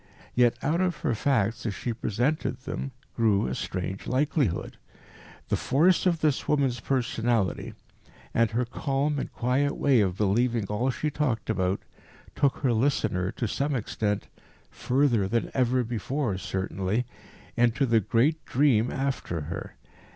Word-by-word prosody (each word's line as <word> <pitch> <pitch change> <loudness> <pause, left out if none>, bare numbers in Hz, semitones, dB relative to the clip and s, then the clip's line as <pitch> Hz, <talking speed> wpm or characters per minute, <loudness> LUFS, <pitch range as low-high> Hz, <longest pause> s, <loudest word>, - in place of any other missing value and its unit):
Yet 120 -1 +3
out 165 +5 +1
of 180 -3 +1
her - - +2
facts, 115 -2 +1
as 100 - -2
she 120 - -3
presented 125 +8 -1
them, 135 0 -4 0.3
grew 110 -4 +3
a 65 - -2
strange 95 +6 -4
likelihood. 135 - 0 0.7
The - - +2
force 170 +8 +3
of 170 -3 +1
this 150 -3 +1
woman's 135 -5 +1
personality, 120 -5 0 0.6
and 115 -1 +3
her 120 +3 0
calm 140 +3 -1
and - - -4
quiet 130 +4 0
way 135 -5 +4
of 95 -2 0
believing 115 +2 +1
all 105 +6 -1
she 150 +3 -2
talked 130 -8 -1
about, 95 -2 0 0.5
took 140 -2 +1
her 125 -3 +3
listener 110 -7 +1
to 120 - -2
some 140 +6 -1
extent 105 -3 -2 0.4
further 125 -6 +1
than 115 +3 -1
ever 125 0 +2
before, 120 0 -2
certainly 95 +5 -2 0.5
into 120 +3 +3
the 115 -3 +4
great 130 - +1
dream 125 -4 +3
after 135 - -2
her. 80 +3 -6
120 Hz, 145 wpm, -27 LUFS, 105-140 Hz, 0.7 s, way